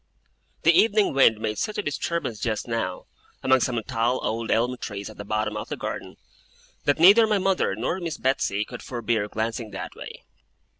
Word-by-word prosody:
The - - +6
evening 215 -2 +4
wind 115 -5 +5
made 105 -1 -2
such 210 - -2
a 210 - -1
disturbance 145 - -2
just 110 +1 -2
now, 115 -6 -3 0.4
among 130 0 +4
some 125 -1 0
tall 125 0 0
old 115 +1 -2
elm 125 +3 +2
trees 105 -2 -6
at - - -16
the 100 - -6
bottom 110 +1 -2
of - - -5
the - - -4
garden, - - -5 0.7
that 145 - +3
neither 200 +7 +7
my 210 -1 +2
mother 190 - +1
nor 125 - -2
Miss 165 -5 -4
Betsey 105 -6 0
could 125 - -9
forbear 115 -4 -1
glancing 110 +1 -3
that 95 - -7
way. - - -10
120 Hz, 185 wpm, -25 LUFS, 110-145 Hz, 0.7 s, neither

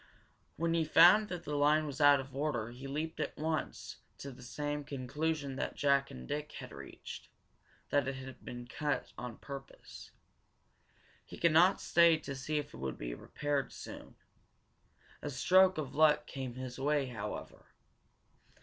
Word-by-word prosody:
When 165 +1 +1
he 165 -1 +2
found 180 +7 +7
that 180 -2 -5
the 150 - -3
line 150 +2 +4
was 145 0 -5
out 145 -1 +7
of 135 0 -8
order 135 -6 -1
he 130 +3 -8
leaped 155 +4 -3
at - - -3
once 155 0 -3 0.2
to 140 - -7
the 125 0 -13
same 145 +4 -3
conclusion 140 +1 -2
that - - -3
Jack 140 -1 +2
and 65 0 -9
Dick 150 +1 -4
had - - -8
reached - - -9 0.6
that 145 -1 +2
it 135 - -2
had 130 -1 -9
been 120 0 -7
cut 145 +4 -2
on 120 -2 -6
purpose. 140 -1 -10 1.1
He - - -11
could 170 - +3
not 180 +5 +5
stay 170 -1 +5
to 145 -3 -6
see 150 +3 -2
if 150 - -4
it - - -9
would 65 -1 -4
be - - -5
repaired 145 - -2
soon. - - -10 1.1
A 145 - -4
stroke 185 +7 +5
of 140 -4 -4
luck 150 0 +4
came 130 -4 -6
his 130 0 -6
way, 145 0 +2
however. 120 -5 -6
145 Hz, 165 wpm, -33 LUFS, 130-155 Hz, 1.1 s, found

